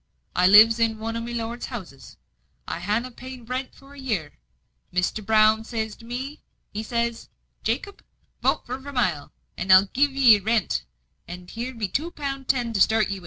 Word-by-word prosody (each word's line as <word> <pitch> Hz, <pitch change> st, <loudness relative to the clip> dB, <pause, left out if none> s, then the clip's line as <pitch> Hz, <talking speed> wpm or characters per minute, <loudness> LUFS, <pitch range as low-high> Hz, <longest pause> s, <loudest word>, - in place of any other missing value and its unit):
I 180 Hz, 0 st, +5 dB
lives 220 Hz, +4 st, +8 dB
in 225 Hz, -1 st, +1 dB
one 225 Hz, +1 st, -4 dB
o' 230 Hz, -, -2 dB
my 235 Hz, +1 st, -6 dB
lord's 235 Hz, 0 st, -4 dB
houses. 180 Hz, -, -9 dB, 0.5 s
I -, -, -4 dB
hanna 215 Hz, +7 st, -1 dB
paid 255 Hz, +1 st, -10 dB
no -, -, -16 dB
rent 255 Hz, +2 st, -4 dB
for 275 Hz, +1 st, -16 dB
a 285 Hz, -, -12 dB
year. 205 Hz, -, -3 dB, 0.5 s
Mr. 180 Hz, +4 st, -1 dB
Brown 215 Hz, +1 st, +4 dB
zays 220 Hz, -2 st, -4 dB
to 230 Hz, -, -15 dB
me, 260 Hz, +5 st, -6 dB, 0.3 s
he 210 Hz, -, -3 dB
zays 235 Hz, +1 st, -2 dB, 0.3 s
'Jacob, 405 Hz, -, -3 dB, 0.4 s
vote -, -, +1 dB
for 255 Hz, +2 st, -5 dB
Vermilye, 245 Hz, -, -1 dB, 0.3 s
and 185 Hz, +2 st, 0 dB
I'll 185 Hz, +1 st, +8 dB
forgive 280 Hz, +8 st, +2 dB
'ee 250 Hz, -6 st, +6 dB
the -, -, -17 dB
rent, 220 Hz, -1 st, 0 dB, 0.4 s
and 180 Hz, +1 st, -9 dB
here 245 Hz, +3 st, -5 dB
be 220 Hz, -3 st, -2 dB
two 305 Hz, -, -2 dB
pound 275 Hz, -5 st, -5 dB
ten 245 Hz, -3 st, 0 dB
to 200 Hz, -, 0 dB
start 220 Hz, 0 st, +4 dB
again 195 Hz, -, -2 dB
wi'. -, -, -9 dB
230 Hz, 195 wpm, -24 LUFS, 210-255 Hz, 0.5 s, lives